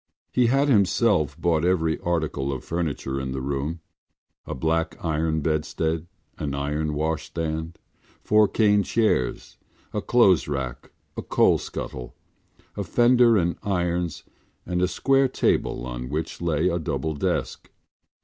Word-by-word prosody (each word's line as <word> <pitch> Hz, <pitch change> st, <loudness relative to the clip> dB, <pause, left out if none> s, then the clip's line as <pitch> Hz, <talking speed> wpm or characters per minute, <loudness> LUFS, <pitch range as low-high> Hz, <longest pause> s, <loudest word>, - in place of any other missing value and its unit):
He 125 Hz, -2 st, +3 dB
had 135 Hz, +4 st, +3 dB
himself 90 Hz, -, +2 dB
bought 80 Hz, -2 st, +1 dB
every 80 Hz, -3 st, +1 dB
article 80 Hz, -5 st, -1 dB
of 65 Hz, -2 st, -5 dB
furniture 75 Hz, -5 st, -2 dB
in 65 Hz, -1 st, -4 dB
the 65 Hz, -, -3 dB
room: 70 Hz, +5 st, -3 dB, 0.7 s
a -, -, -4 dB
black 80 Hz, +4 st, -1 dB
iron 80 Hz, 0 st, 0 dB
bedstead, 80 Hz, +1 st, -1 dB, 0.3 s
an 70 Hz, -2 st, -2 dB
iron 75 Hz, +2 st, -2 dB
washstand, 80 Hz, +1 st, -3 dB, 0.5 s
four 105 Hz, 0 st, +4 dB
cane 105 Hz, -1 st, +3 dB
chairs, 105 Hz, -, 0 dB, 0.4 s
a -, -, -1 dB
clothes 100 Hz, -8 st, +4 dB
rack, 70 Hz, -4 st, -4 dB, 0.3 s
a -, -, -4 dB
coal -, -, +3 dB
scuttle, 60 Hz, -1 st, -7 dB, 0.6 s
a -, -, -2 dB
fender 120 Hz, -1 st, +4 dB
and 85 Hz, -2 st, 0 dB
irons 90 Hz, -4 st, -1 dB, 0.4 s
and 90 Hz, 0 st, -1 dB
a 90 Hz, -, +3 dB
square 135 Hz, +9 st, +2 dB
table 95 Hz, -, 0 dB
on 60 Hz, 0 st, -5 dB
which 80 Hz, +4 st, -4 dB
lay 85 Hz, 0 st, +1 dB
a 85 Hz, -1 st, 0 dB
double 80 Hz, 0 st, -2 dB
desk. 70 Hz, -, -2 dB
80 Hz, 135 wpm, -24 LUFS, 75-90 Hz, 0.7 s, four